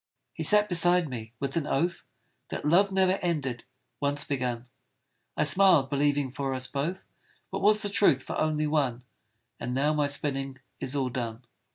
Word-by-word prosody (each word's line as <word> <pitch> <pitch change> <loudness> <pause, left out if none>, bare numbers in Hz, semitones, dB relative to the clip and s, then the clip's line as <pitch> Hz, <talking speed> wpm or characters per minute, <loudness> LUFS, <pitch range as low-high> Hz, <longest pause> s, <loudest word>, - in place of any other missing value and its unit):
He - - -7
sat 210 0 +4
beside 175 -1 +2
me, 115 -4 -7
with 140 -1 -3
an 160 -3 -1
oath 170 +5 -1 0.4
That - - -5
love 190 +6 +4
ne'er 190 0 +2
ended, 140 -9 -2 0.3
once 145 0 0
begun; 125 -3 -3 0.7
I - - +3
smiled, 180 -8 +5
believing 145 -1 +1
for 135 0 -3
us 130 0 0
both, 150 +8 -3 0.5
What - - -3
was 210 +1 +3
the - - -1
truth 170 -10 +3
for - - -5
only 155 -1 0
one: 140 -5 0 0.6
And 125 +1 -4
now 145 +3 +2
my 150 -1 +1
spinning 135 -1 -2 0.2
is 130 - -4
all 135 -2 0
done. 120 -1 -5
145 Hz, 170 wpm, -28 LUFS, 130-170 Hz, 0.7 s, smiled